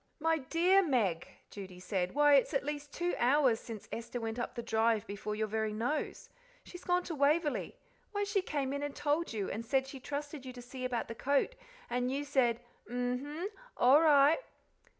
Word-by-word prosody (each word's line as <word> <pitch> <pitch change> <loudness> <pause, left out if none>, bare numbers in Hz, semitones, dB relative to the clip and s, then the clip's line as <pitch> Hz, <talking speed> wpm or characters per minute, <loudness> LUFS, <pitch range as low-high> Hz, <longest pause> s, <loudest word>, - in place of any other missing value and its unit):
"My 325 +1 +2
DEAR 345 +8 +4
Meg!" 220 - +1 0.2
Judy 190 -3 -9
said; 185 +1 -2
"why, 295 0 +6
it's 275 +2 +4
at 275 - 0
least 290 -1 -4
two 350 +1 -1
hours 255 -2 +4
since 220 -3 -8
Esther 235 +1 -4
went 225 +1 -4
up 240 - -4
the 235 - -4
drive 225 -1 +2
before 205 +1 -4
your 220 +1 0
very 215 0 -1
nose. 240 +8 -2 0.4
She's 355 - -11
gone 360 0 +2
to 340 - -5
Waverly 295 +1 +1 0.4
why, 410 -1 -1
she 405 -1 +1
came 280 -6 -2
in 285 - -2
and 290 -1 -4
told 295 +3 0
you, 210 -4 -3
and 225 - -4
said 265 +3 +1
she 270 0 -9
trusted 285 +1 -5
you 255 -1 -7
to 250 - -10
see 255 +1 -6
about 245 -2 -2
the - - -5
coat, 280 - +1 0.3
and 245 +1 -1
you 280 +2 -1
said, 250 -5 +2 0.3
'M 245 +1 -1
'm! 310 +7 -4 0.3
all 270 +5 +6
right.'" 295 - +6
270 Hz, 195 wpm, -32 LUFS, 230-295 Hz, 0.4 s, why